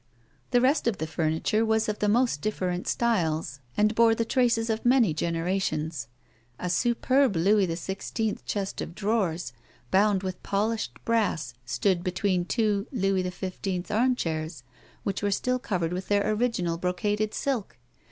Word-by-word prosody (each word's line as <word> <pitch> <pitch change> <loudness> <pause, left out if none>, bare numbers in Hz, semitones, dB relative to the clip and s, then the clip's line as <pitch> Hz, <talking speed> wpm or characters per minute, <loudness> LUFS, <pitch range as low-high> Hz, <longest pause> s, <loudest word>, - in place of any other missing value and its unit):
The 245 - +3
rest 265 +1 +3
of 225 -5 +1
the 160 - -2
furniture 160 +7 0
was 220 0 +2
of 210 -1 -2
the 210 - +2
most 235 - +2
difi'erent 185 -4 -2
styles, 160 - 0 0.2
and 210 +1 +3
bore 225 0 +5
the 230 - 0
traces 230 -2 +2
of 220 - -2
many 240 -8 +4
generations. 165 -4 -1 0.5
A 180 - -3
superb 245 +4 +2
Louis 195 +4 +3
XVI. 190 +5 -3
chest 195 -2 -3
of 170 - -6
drawers, 190 - -1 0.4
bound 195 -1 +3
with 185 -1 -4
polished 215 +3 -1
brass, 205 - 0
stood 175 +7 +1
be 185 - 0
tween 185 -2 +1
two 210 -1 0
Louis 195 -6 +1
X"\' 185 0 -4
armchairs 165 - 0 0.4
which 195 - -2
were 205 - +1
still 250 +5 0
covered 180 -8 -1
with 185 +1 -4
their 205 +1 +2
original 210 -7 0
brocaded 205 +4 -1
silk. 260 -8 -2
200 Hz, 150 wpm, -27 LUFS, 175-225 Hz, 0.5 s, bore